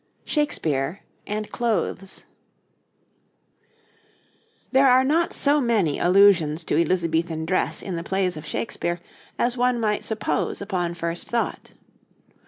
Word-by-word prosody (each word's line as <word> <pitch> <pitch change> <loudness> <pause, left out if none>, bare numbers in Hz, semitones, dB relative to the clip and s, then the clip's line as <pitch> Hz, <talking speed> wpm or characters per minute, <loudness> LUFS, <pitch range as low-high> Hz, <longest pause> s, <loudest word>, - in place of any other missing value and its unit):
SHAKESPEARE 165 - -1 0.3
AND 210 0 -4
CLOTHES 205 -4 -2 2.5
There 270 0 +5
are 255 +1 +5
not 320 +5 +1
so 290 +1 +3
many 215 - +1
allusions 175 -4 +4
to - - -1
Elizabethan 165 -2 0
dress 185 +3 -1
in 185 -3 -4
the 165 - -4
plays 190 -1 -1
of 155 - -8
Shakespeare 175 -1 -3 0.4
as 245 +1 +1
one 245 0 +2
might 210 -2 0
suppose 220 -1 -2
upon 180 -4 -2
first 170 0 -4
thought. 235 -1 -3
195 Hz, 115 wpm, -24 LUFS, 170-235 Hz, 2.5 s, There